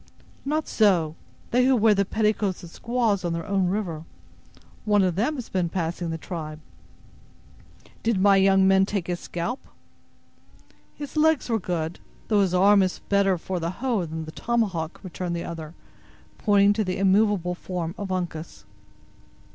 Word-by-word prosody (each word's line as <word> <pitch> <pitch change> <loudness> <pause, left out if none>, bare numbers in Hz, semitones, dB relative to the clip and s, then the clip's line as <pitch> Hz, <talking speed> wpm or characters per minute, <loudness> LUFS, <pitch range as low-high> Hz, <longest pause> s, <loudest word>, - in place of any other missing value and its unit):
"Not 305 +2 -1
so. 175 -8 +2 0.4
They 250 +1 +4
who 265 0 +4
wear 220 -2 +5
the 200 0 +1
petticoats 210 -3 0
of 170 - -10
squaws, 230 -4 0
on 170 -1 -1
their 165 0 -4
own 195 -3 +1
river. 180 -5 -2 0.8
One 205 -2 +3
of 185 -2 +1
them 230 - 0
has 250 -5 -6
been 180 -3 -1
passing 170 0 -3
the 165 - -3
tribe." 155 -3 -6 1.4
"Did 225 -4 +1
my 200 0 +5
young 195 0 +5
men 195 0 +4
take 200 -5 -2
his 175 -1 -3
scalp?" 200 +10 -4 1.4
"His 290 +1 -8
legs 310 -3 +3
were 225 - +2
good, 170 -3 -3 0.3
though 210 -2 +4
his 185 -2 +1
arm 200 +2 +6
is 185 -1 0
better 200 -2 +3
for 180 +2 -4
the 165 0 -2
hoe 225 -3 -1
than 160 0 -5
the 155 - -8
tomahawk," 190 -8 -1
returned 180 -1 -4
the 170 - -4
other, 165 -1 -7 0.6
pointing 205 -1 +4
to 215 +1 0
the 185 -2 -2
immovable 195 -2 +2
form 175 -2 -4
of 200 -3 -5
Uncas. 175 -3 -4
190 Hz, 165 wpm, -25 LUFS, 170-210 Hz, 1.4 s, arm